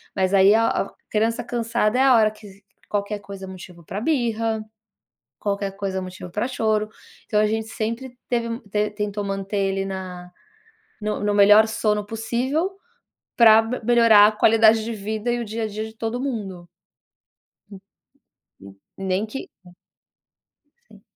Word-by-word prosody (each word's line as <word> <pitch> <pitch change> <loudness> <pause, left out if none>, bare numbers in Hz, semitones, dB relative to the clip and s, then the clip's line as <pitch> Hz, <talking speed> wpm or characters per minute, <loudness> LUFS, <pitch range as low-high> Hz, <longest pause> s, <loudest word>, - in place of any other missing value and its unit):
Mas 190 0 0
aí, 195 +1 +6
a 225 +1 +3
a - - -2 0.2
criança 225 +3 0
cansada 235 0 0
é - - +5
a 265 -2 +6
hora 215 -2 +4
que 205 -2 -15 0.3
qualquer 205 0 -2
coisa 200 -1 -9
é - - -11
motivo 180 -2 -11
pra 195 - -5
birra, 230 -5 0 0.8
qualquer 200 -1 -2
coisa 195 -1 -3
é - - -5
motivo 185 -1 -8
pra 210 +6 -1
choro, 215 -4 0 0.4
então 210 - +1
a 215 - +3
gente 220 +1 -2
sempre 235 +3 -5
teve 230 -1 -1
te 210 +1 0
tentou 210 -1 -3
manter 195 +1 -3
ele 195 0 0
na 185 -2 -7 0.7
no 210 0 -2
no 205 0 0
melhor 205 +2 +7
sono 215 -2 0
possível, 245 - -2 0.6
pra 225 -2 +8 0.2
melhorar 230 -3 +6
a - - -1
qualidade 220 0 +4
de 230 - -4
vida 215 +2 -3
e 240 - -1
o - - -3
dia 225 +1 -4
a - - 0
dia 215 +1 -5
de 220 - -12
todo 225 +2 -3
mundo. 200 -10 -5 1.0
N 195 -2 -11 0.8
n 100 0 -13 0.3
nem 190 +3 0
que 270 +5 -7 1.4
Sim. - - -18
215 Hz, 160 wpm, -22 LUFS, 200-230 Hz, 1.4 s, pra